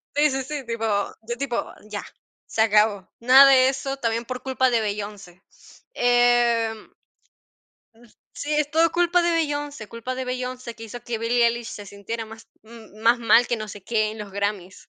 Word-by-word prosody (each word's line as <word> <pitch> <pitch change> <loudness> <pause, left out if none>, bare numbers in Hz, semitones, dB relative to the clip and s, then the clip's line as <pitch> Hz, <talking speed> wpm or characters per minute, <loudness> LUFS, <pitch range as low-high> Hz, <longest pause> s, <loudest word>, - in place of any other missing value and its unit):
Sí 295 +1 +4
sí 265 0 -2
sí, 290 0 -5
tipo 230 -1 -3 0.5
tipo, 260 -4 -3
ya, 210 -1 -6 0.4
se 220 - -1
acabó, 210 -2 +2
nada 260 +3 +8
de 260 -1 +6
eso, 270 0 -4
también 230 -2 -2
por 255 0 -6
culpa 260 -1 +1
de 235 -2 +1
Beyoncé, 205 -3 -6 0.5
em. 240 -2 +2 1.4
Sí, 295 - -5
es 300 -1 0
todo 325 +1 +3
culpa 350 0 +2
de 345 - +1
Beyoncé 290 -7 -2
culpa 230 +3 -6
de 260 0 -4
Beyoncé, 250 -1 -5
que 225 0 -12
hizo 235 +2 -8
que 235 -2 -4
Billy 235 +1 +2
Ellis 235 0 +1
se 205 - -8
sintiera 210 +3 -6
más 225 +1 -13 0.5
más 235 +1 +4
mal, 230 +1 +5
que 240 - -1
no 215 0 -6
sé 205 -1 -10
qué, 215 -1 0
en 220 - -8
los 205 -2 -8
Grammys. 200 -2 -3
235 Hz, 175 wpm, -23 LUFS, 215-260 Hz, 1.4 s, nada